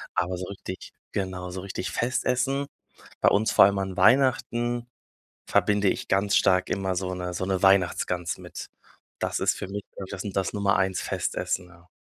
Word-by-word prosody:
aber 90 +1 0
so 90 - -5
richtig 95 -1 -8 0.2
genau, 95 -2 -3
so 90 +1 -6
richtig 95 -1 -4
Festessen, 130 +3 0 0.5
bei - - +6
uns 105 +2 +2
vor - - +8
allem 100 0 +2
an 95 -1 -3
Weihnachten, 120 -2 +3 0.6
verbinde 105 -1 +3
ich - - -1
ganz 100 +1 +2
stark 95 -1 +3
immer 95 -1 -1
so 90 0 -2
'ne 90 -1 -4
so 95 - -2
'ne 95 -1 0
Weihnachtsgans 90 -2 +2
mit. - - -8 0.5
Das - - -2
ist - - +2
für - - -4
mich 100 +1 -5 0.2
so 100 - -4
das 95 - -5
das 95 -1 -1
Nummer 100 -1 +2
1 95 0 0
Festessen, 90 - -2
ja. 85 0 -20
95 Hz, 175 wpm, -26 LUFS, 90-105 Hz, 0.6 s, vor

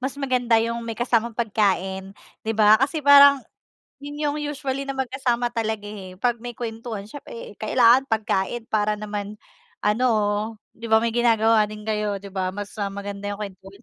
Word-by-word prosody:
mas 265 +1 -3
maganda 250 -4 +1
'yong 230 +1 0
may 230 -1 -6
kasamang 235 -1 0
pagkain, 195 -3 -1 0.2
'di 225 - -2
ba. 215 +1 +6
Kasi 290 +2 0
parang 280 -1 +8 0.6
'yon 290 +1 -8
'yong 295 -1 0 0.2
usually 275 -1 -3
na 275 - -3
magkasama 255 -2 -1
talaga, 220 -3 -2
eh, 190 -3 -9
pag 240 0 0
may 240 0 -7
kuwentuhan, 225 -3 -5
siyempre 465 - -9
kailangan 255 +2 +4
pagkain 220 +1 -1
para 210 0 +1
naman 210 0 -5 0.5
ano, 220 +5 +2 0.7
'di 230 - -8
ba, 220 - +5
may 230 0 -1
ginagawa 225 -2 +4
din 210 0 -9
kayo, 210 -1 -1
'di 200 - -9
ba, 190 -1 -1
mas, 205 0 -6
ah, 200 - 0
maganda 200 0 -6
'yong 205 +1 -6
kwentuhan. 195 +1 -16
225 Hz, 170 wpm, -23 LUFS, 210-250 Hz, 0.7 s, parang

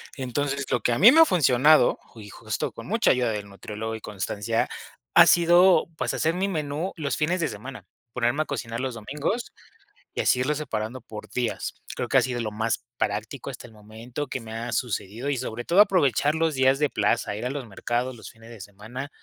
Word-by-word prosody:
Entonces, 140 +1 -2
lo - - +2
que 120 +2 +1
a 120 - -1
mí 220 +7 +9
me 320 - +5
ha 325 - +9
funcionado, 150 - +4
ju 110 - -15
y 105 - -11
justo - - -4
con - - -10
mucha - - +3
ayuda 125 -2 +1
del 105 -1 -5
nutriólogo 105 +3 -6
y 110 - -9
constancia, 105 +2 -2 0.5
ha - - +9
sido, 175 +2 +5
pues, - - -1
hacer 160 +1 +1
mi 190 +2 -1
menú 155 0 -3
los 150 -4 -2
fines 170 +4 0
de 165 - +1
semana, 125 +6 -9 0.3
ponerme 125 +5 +1
a - - -18
cocinar 115 -5 -4
los 130 0 -3
domingos, 145 - -3 0.6
y - - -1
así 125 - +3
irlos 145 +3 0
separando 115 -3 -4
por 110 -3 -10
días. 125 -2 -2 0.2
Creo - - -3
que - - +4
ha - - +6
sido 125 -2 -2
lo 110 -2 -3
más 110 +3 -2
práctico 110 +6 -3
hasta 125 - -9
el 115 - -14
momento 110 +6 -7
que 130 - -4
me 110 -1 -9
ha 115 +2 -4
sucedido, 115 +1 -3
y 140 - 0
sobre 120 -1 -5
todo 185 +4 +5
aprovechar 150 - +3
los 160 0 +1
días 130 0 +3
de 150 -1 +2
plaza, 105 -2 0
ir 110 +4 -5
a - - -1
los 135 -1 -5
mercados, 120 +4 -2
los 110 - -10
fines 115 0 -16
de 115 -4 -11
semana, 105 +8 -8
125 Hz, 215 wpm, -25 LUFS, 110-145 Hz, 0.6 s, mí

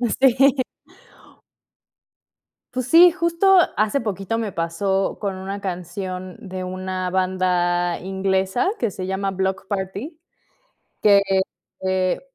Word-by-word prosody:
Sí. 260 +2 +3 2.1
Pues 255 -1 -2
sí, 340 +6 +8
justo 340 +3 +3 0.2
hace 215 +6 +1
poquito 210 0 -3
me 220 -3 -3
pasó 190 +4 -1
con 200 -2 -2
una 195 +2 -5
canción 185 0 -5
de 190 -4 -7
una 185 0 -3
banda 180 -2 +1
inglesa 190 - 0
que 230 -4 -1
se 185 0 -5
llama 195 0 -1
Bloc 190 +1 -2
Party, 200 - -4 0.9
que, 205 -1 +6 0.6
eh, 185 -1 0
190 Hz, 105 wpm, -22 LUFS, 185-225 Hz, 2.1 s, sí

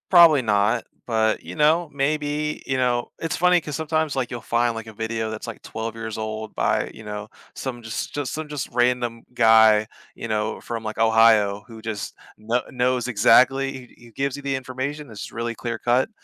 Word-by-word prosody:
Probably 170 -6 +8
not, 110 +1 +2 0.2
but, 110 -2 +1
you - - -9
know, 160 +2 +3
maybe, 150 +1 -1
you 135 - -1
know 125 -2 0
it's 165 - -2
funny, 180 0 +4
'cause 150 -2 -5
sometimes, 160 -1 0
like, 130 -3 -1
you'll 120 -2 -6
find, 120 0 +1
like, 115 0 -6
a - - -8
video 110 +1 -3
that's, 110 +2 -6
like, 115 - -7
12 110 0 -5
years 110 -1 -5
old 110 0 -5
by, - - 0
you 110 - -12
know, 105 0 -6 0.3
some 125 -3 -5
just 110 -1 -5
just 145 -4 -3
some 155 -1 -5
just 145 -3 -4
random 120 -1 +1
guy, 110 -2 +6 0.3
you - - -7
know, 110 0 -1
from, 115 -1 -5
like, 110 0 -5
Ohio 110 -2 +4
who 115 -2 -12
just 110 -2 -5 0.2
kno 115 +3 -1
knows 125 -1 0
exactly 130 +4 +4
he 130 -2 -11
he - - -17
gives 135 +4 -2
you 145 - -8
the 140 -1 -1
information, 130 +3 -5
it's 110 -2 -8
really 115 0 -3
clear-cut, 120 - 0
120 Hz, 190 wpm, -23 LUFS, 110-135 Hz, 0.3 s, Probably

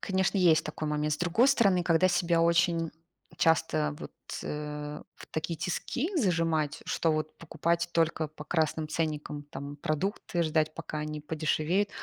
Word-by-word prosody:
конечно, 190 +1 +1
есть 160 -4 +5
такой 155 0 -4
момент. 150 0 0
С 150 - -1
другой 180 +10 +3
стороны, 200 -9 +4
когда 170 +2 +4
себя 175 -2 +2
очень 170 -1 +3 0.5
часто, 155 -2 +2
вот, - - -8 0.3
э, 150 0 -5
в - - -12
такие 160 +1 -3
тиски 245 - -2
зажимать, 165 - +1
что 165 - +1
вот 155 0 -2
покупать 170 +1 -1
только 165 -1 +1
по 150 0 -11
красным 155 -1 0
ценникам 150 -2 -2
там 145 0 -7
продукты, 170 +3 -1
ждать, 155 -1 +1
пока 155 -1 -5
они 150 0 -4
подешевеют, 155 +5 0
160 Hz, 150 wpm, -29 LUFS, 150-175 Hz, 0.5 s, есть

